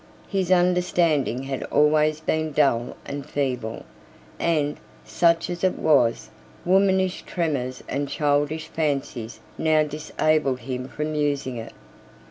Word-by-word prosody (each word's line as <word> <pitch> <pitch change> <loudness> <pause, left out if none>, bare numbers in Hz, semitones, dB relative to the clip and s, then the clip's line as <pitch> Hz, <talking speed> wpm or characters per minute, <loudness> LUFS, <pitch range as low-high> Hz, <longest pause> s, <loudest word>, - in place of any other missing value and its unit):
His 190 -3 -1
understanding 175 -7 +2
had 135 -1 -4
always 150 +1 +3
been 155 -1 -1
dull 125 -5 +1
and 140 0 -5
feeble; 125 -6 -3 0.5
and, 150 -3 0 0.3
such 165 +10 +2
as 175 0 -5
it 185 - +2
was, 135 -7 +2 0.3
womanish 190 0 +3
tremors 140 -7 -2
and 140 +1 -2
childish 145 +1 0
fancies 135 -7 -3 0.2
now 155 -1 +3
disabled 150 -2 0
him 125 +1 -4
from 150 +2 -4
using 145 -4 -1
it. 115 0 -7
150 Hz, 115 wpm, -24 LUFS, 135-165 Hz, 0.5 s, always